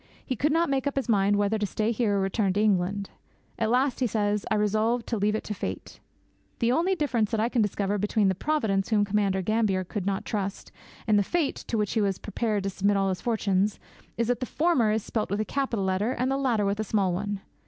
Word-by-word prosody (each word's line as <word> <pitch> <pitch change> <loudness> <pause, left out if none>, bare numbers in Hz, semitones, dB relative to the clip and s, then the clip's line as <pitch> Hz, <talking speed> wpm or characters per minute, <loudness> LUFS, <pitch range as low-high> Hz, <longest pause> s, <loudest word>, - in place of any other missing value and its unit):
He 260 - -2
could 295 +6 +1
not 335 +2 +2
make 275 0 0
up 285 - -2
his 275 - -1
mind 205 -2 +3
whether 205 +2 +1
to 210 - 0
stay 215 +3 -1
here 220 -3 +1
or - - +1
return 195 0 0
to 205 - 0
England. 200 -1 +1 0.5
'At 220 - +1
last,' 255 +2 +2
he 255 - +2
says, 210 -1 -1
'I - - +2
resolved 215 +3 +1
to 230 - -2
leave 210 +1 +1
it - - -3
to 210 - -4
fate.' - - -6 0.6
The 235 0 +1
only 345 +8 +2
difference 250 - 0
that 225 - -1
I 225 +2 +1
can 245 -2 +1
discover 205 0 0
between 205 0 +2
the 190 - +3
'Providence' 210 - 0
whom 210 -2 +3
Commander 200 -2 0
Gambier 215 -2 +1
could 190 +1 -4
not 195 -1 -1
trust, 200 -3 -4 0.3
and 215 -2 +4
the - - +3
'fate' 325 - 0
to 230 - -1
which 210 -2 0
he 225 - +2
was 195 -2 0
prepared 210 -1 -2
to 195 - -2
submit 200 +1 +1
all 195 0 +1
his 185 -1 -3
fortunes, 205 -3 0 0.4
is 230 0 0
that 245 - +1
the 255 - -3
former 300 -9 +2
is 215 -1 0
spelt 220 -2 -2
with 200 +2 -1
a 215 - 0
capital 245 -8 -1
letter 190 +6 0
and 255 +2 -1
the - - +1
latter 240 -7 +1
with 200 +1 -1
a - - +1
small 195 -4 +1
one! 205 +2 -3
210 Hz, 245 wpm, -27 LUFS, 200-235 Hz, 0.6 s, and